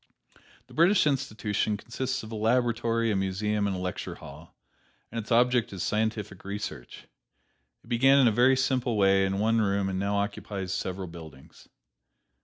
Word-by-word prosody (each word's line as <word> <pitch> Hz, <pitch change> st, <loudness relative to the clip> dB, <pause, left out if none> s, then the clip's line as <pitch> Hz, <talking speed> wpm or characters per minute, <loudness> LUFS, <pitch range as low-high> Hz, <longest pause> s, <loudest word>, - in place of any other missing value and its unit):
The -, -, -18 dB
British 175 Hz, +4 st, +4 dB
Institution 110 Hz, -7 st, -1 dB
consists 130 Hz, +4 st, -4 dB
of 110 Hz, -, -9 dB
a -, -, -5 dB
laboratory, 115 Hz, 0 st, +1 dB
a -, -, 0 dB
museum 100 Hz, +2 st, -1 dB
and 100 Hz, -, -2 dB
a -, -, -4 dB
lecture 90 Hz, 0 st, -4 dB
hall, -, -, -13 dB, 0.6 s
and 115 Hz, -, -3 dB
its 110 Hz, -, -8 dB
object 120 Hz, 0 st, +3 dB
is 95 Hz, -3 st, -4 dB
scientific 105 Hz, -3 st, -2 dB
research. 100 Hz, -10 st, -7 dB, 0.8 s
It -, -, -21 dB
began 135 Hz, +3 st, +4 dB
in 135 Hz, -3 st, +6 dB
a -, -, +4 dB
very 125 Hz, +4 st, +4 dB
simple 130 Hz, -3 st, 0 dB
way 95 Hz, -1 st, +4 dB
in 95 Hz, 0 st, -2 dB
one 110 Hz, +2 st, +2 dB
room 100 Hz, -1 st, 0 dB
and 95 Hz, -1 st, -2 dB
now 100 Hz, +1 st, -1 dB
occupies 100 Hz, -2 st, -3 dB
several 95 Hz, 0 st, -3 dB
buildings. 80 Hz, -5 st, -13 dB
105 Hz, 165 wpm, -27 LUFS, 95-120 Hz, 0.8 s, in